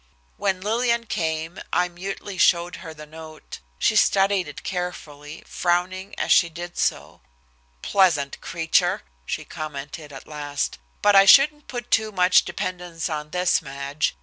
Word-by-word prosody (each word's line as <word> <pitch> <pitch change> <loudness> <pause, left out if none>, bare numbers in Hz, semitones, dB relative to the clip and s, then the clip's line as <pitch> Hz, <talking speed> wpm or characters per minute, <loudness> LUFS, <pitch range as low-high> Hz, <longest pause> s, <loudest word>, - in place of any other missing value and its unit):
When 190 -2 -1
Lillian 235 +3 0
came, 160 -2 -3
I 180 0 +2
mutely 190 +2 -7
showed 175 0 +3
her 160 - -9
the 155 -1 -11
note. 155 0 -11 0.2
She - - +2
studied 195 -2 +3
it 150 - -9
carefully, 160 -5 -6
frowning 185 +2 -1
as - - -1
she 170 - +5
did 175 +2 -8
so. - - -2 0.6
"Pleasant 165 -8 +2
creature!" 165 -1 +1 0.2
she - - -3
commented 150 0 -7
at 135 -2 -10
last. 145 - -4 0.2
"But 205 -1 +5
I 195 0 +8
shouldn't 295 +7 +6
put 240 -1 -7
too 220 -1 +2
much 180 -2 +4
dependence 175 -2 -4
on 150 -1 -4
this, 180 +2 +1
Madge. 140 +2 -3
175 Hz, 145 wpm, -23 LUFS, 155-195 Hz, 0.6 s, I